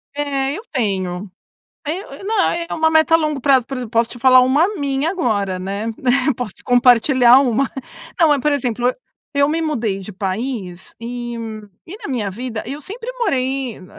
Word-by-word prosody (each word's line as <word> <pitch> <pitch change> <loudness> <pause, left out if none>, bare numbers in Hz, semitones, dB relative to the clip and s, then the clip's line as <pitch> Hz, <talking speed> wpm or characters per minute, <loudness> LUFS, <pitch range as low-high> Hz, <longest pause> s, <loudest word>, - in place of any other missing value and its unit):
É, 280 -1 -1
eu 420 - -6
tenho, 190 -5 -2 0.6
é 350 +7 -5
eu - - -10
não 430 -1 +1
é 340 0 0
uma 320 0 +2
meta 320 +1 +4
a - - +9
longo 305 -4 -1
prazo, 265 -3 +3
por 270 - -5
exemplo, 245 -3 -5
posso 230 -1 +1
te 245 - -9
falar 255 +1 +7
uma 280 +8 +3
minha 280 +1 -1
agora, 205 - -1
né? 200 +4 -4 0.5
Posso 240 -6 -4
te - - -22
compartilhar 245 0 +5
uma, 260 0 +1 0.5
não 320 -2 +6
é, 290 - +2
por 295 +2 +1
exemplo, 245 -3 -1
eu - - 0 0.4
eu 280 0 +3
me 325 +2 0
mudei 235 -11 -1
de 195 - -8
país 190 -1 -4
e 240 0 -5 0.5
e 380 +5 -8
na - - -5
minha 220 -7 -2
vida 230 +2 -5
eu 280 +4 -5
sempre 460 - -6
morei 265 - -1
Eu 185 - -13
255 Hz, 190 wpm, -19 LUFS, 225-295 Hz, 0.6 s, a